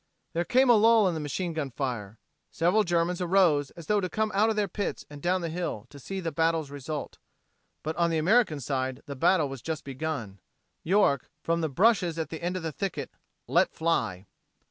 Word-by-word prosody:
There 170 +1 0
came 260 +6 +4
a 240 - +7
lull 225 -1 +5
in 180 - 0
the 160 - -3
machine 165 +4 -3
gun 155 -3 -2
fire. 115 -6 -4 0.3
Several 180 +6 +2
Germans 175 0 0
arose 170 -6 +3
as 170 - -9
though 210 +3 +2
to 185 - -2
come 215 +4 -1
out 210 +3 +3
of 220 - 0
their 210 -1 +1
pits 200 +2 -4
and 145 -1 -9
down 180 +3 +1
the 170 - -3
hill 165 -10 -4
to 140 - -11
see 195 +8 -5
the 170 -3 -3
battle's 160 -3 0
result. 145 +1 -6 0.6
But 160 +1 -3
on 170 -1 +3
the 165 - 0
American 180 -1 +3
side 130 0 -3
the 140 -2 -6
battle 155 +3 +3
was 135 -3 -7
just 160 -2 -4
begun. 135 -8 -5 0.4
York, 170 - +2
from 170 0 0
the 160 - 0
brushes 180 - +3
at 160 -3 -3
the 160 - -6
end 180 +2 -2
of 180 - -6
the 160 - -2
thicket, 195 +3 -4 0.3
"let - - +2
fly." 160 - 0
165 Hz, 210 wpm, -28 LUFS, 145-185 Hz, 0.6 s, a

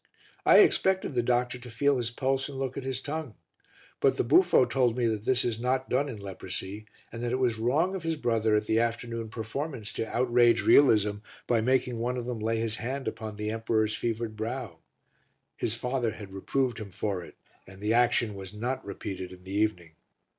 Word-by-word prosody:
I - - +9
expected 190 - +3
the 120 - +2
doctor 125 +1 0
to 120 0 -10
feel 140 +4 +2
his 120 -2 -1
pulse 135 +3 -1
and 140 - -7
look 135 -1 -3
at 140 - -4
his 130 -1 -3
tongue, 150 -6 -4 0.6
but - - +3
the - - +2
buffo 150 +2 +5
told 125 -1 +1
me 120 - +1
that 110 -2 -1
this 130 -1 +2
is 115 -2 -1
not 130 +2 -1
done 140 +3 +1
in 120 - -6
leprosy 95 +1 -6 0.2
and 115 - -7
that 120 -1 -1
it 130 - +1
was 120 -4 +1
wrong 150 +11 +2
of 190 - -3
his 165 0 -1
brother 115 -6 +1
at 105 0 +1
the 110 +1 +2
afternoon 115 -1 -2
performance 115 +1 -5
to 110 - -3
outrage 120 -1 +3
realism 105 -7 +5 0.3
by 120 -2 +2
making 125 0 +1
one 125 +2 -1
of 120 - -4
them 120 -2 -4
lay 115 +1 0
his 110 -1 -1
hand 130 +4 -4
upon 110 -2 -5
the 105 +1 -3
emperor's 110 -1 0
fevered 115 -1 -3
brow; 115 -5 -5 0.8
his 115 - -2
father 125 0 -1
had 100 -3 -10
reproved 120 +5 -1
him 105 -2 -7
for 95 -1 -3
it - - -13 0.3
and 95 0 -13
the 105 +2 0
action 120 -2 +3
was 95 0 -9
not 125 +4 -3
repeated 95 -2 -6
in 90 0 -13
the 95 +1 -8
evening. 100 -6 0
115 Hz, 205 wpm, -28 LUFS, 110-130 Hz, 0.8 s, I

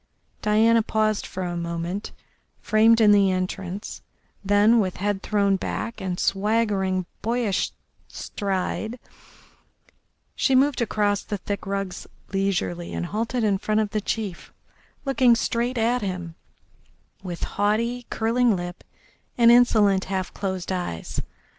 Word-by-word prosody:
Diana 225 +2 +4
paused 215 -1 0
for 185 - -5
a 175 -1 -3
moment 170 +3 -4 0.5
framed 225 +1 +4
in 215 -2 +6
the 200 -1 +5
entrance, 185 +1 -4 0.4
then, 205 +4 +4
with 185 -4 -1
head 205 0 -1
thrown 200 -2 +1
back 230 +4 -4
and 185 -2 -3
swaggering, 195 -3 +1 0.2
boyish 230 -3 0 0.4
stride, 200 +4 -3 1.4
she 265 - +2
moved 270 0 +3
across 205 -3 +1
the 205 - -4
thick 200 +1 -5
rugs 195 -2 -4 0.3
leisurely 190 -3 -1
and - - -2
halted 225 +5 -2
in 200 -3 +2
front 215 +1 0
of 210 -2 -1
the 215 - -1
chief, 205 -3 -4 0.5
looking 260 -3 +4
straight 240 +2 -1
at 235 +2 +1
him 180 -4 -4 0.9
with 175 -3 -6
haughty, 230 +4 -1
curling 230 0 +2
lips 175 0 -6 0.5
and 235 -1 +7
insolent, 215 -5 +4
half 190 -1 -3
closed 190 -2 -3
eyes. 175 - -3
205 Hz, 125 wpm, -24 LUFS, 190-225 Hz, 1.4 s, and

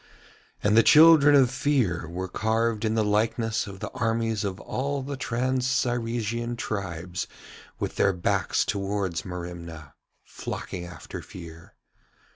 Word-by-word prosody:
And 105 +1 +3
the 115 - +8
children 150 0 +7
of 130 -3 +5
Fear 120 - 0
were 90 +2 -4
carved 110 +2 0
in 110 0 +1
the 110 - +2
likeness 110 +1 0
of 95 -1 -9
the - - -5
armies 115 -2 -1
of 100 -1 -3
all 140 +1 -3
the 140 +1 -4
trans 130 -1 -1
Cyresian 120 -2 -1
tribes 90 -5 -4 0.5
with - - -4
their 100 - +4
backs 90 -2 0
towards 100 -4 -2
Merimna, 85 -4 -7 0.3
flocking 90 -2 -6
after 90 -1 -8
Fear. 85 -2 -12
110 Hz, 130 wpm, -26 LUFS, 90-120 Hz, 0.5 s, the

